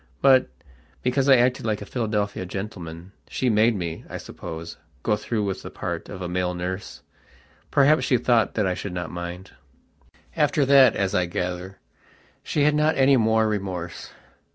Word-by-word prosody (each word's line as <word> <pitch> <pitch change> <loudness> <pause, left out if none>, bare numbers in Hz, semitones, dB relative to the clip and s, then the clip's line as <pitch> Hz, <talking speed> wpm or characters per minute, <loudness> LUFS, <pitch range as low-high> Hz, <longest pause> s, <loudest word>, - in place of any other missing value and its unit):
But, 130 - +5 0.5
because 130 +2 +1
I 135 - +9
acted 125 +1 +2
like 105 -1 0
a 100 - -7
Philadelphia 105 -5 -2
gentleman, 90 -3 -7 0.2
she 125 -2 0
made 110 +2 +3
me, 85 -4 -4
I - - -5
suppose, 80 +1 -8 0.3
go 105 - +2
through 110 0 -2
with 100 -2 -3
the - - -8
part - - -5
of 95 - -7
a - - -3
male 90 0 -1
nurse. 90 +2 -5 0.7
Perhaps 145 +3 +4
she 125 - +3
thought 120 -1 +2
that 105 - +1
I 95 - +1
should 95 +1 -6
not 90 -2 -4
mind. 85 +2 -7 0.8
After 145 - +2
that, 135 -3 +6
as 100 -1 0
I 90 -1 +1
gather, 90 +2 -4 0.6
she 145 - 0
had 150 +1 +4
not 150 +1 +2
any 135 0 +5
more 110 -2 +3
remorse. 95 -5 -4
105 Hz, 170 wpm, -24 LUFS, 90-125 Hz, 0.8 s, I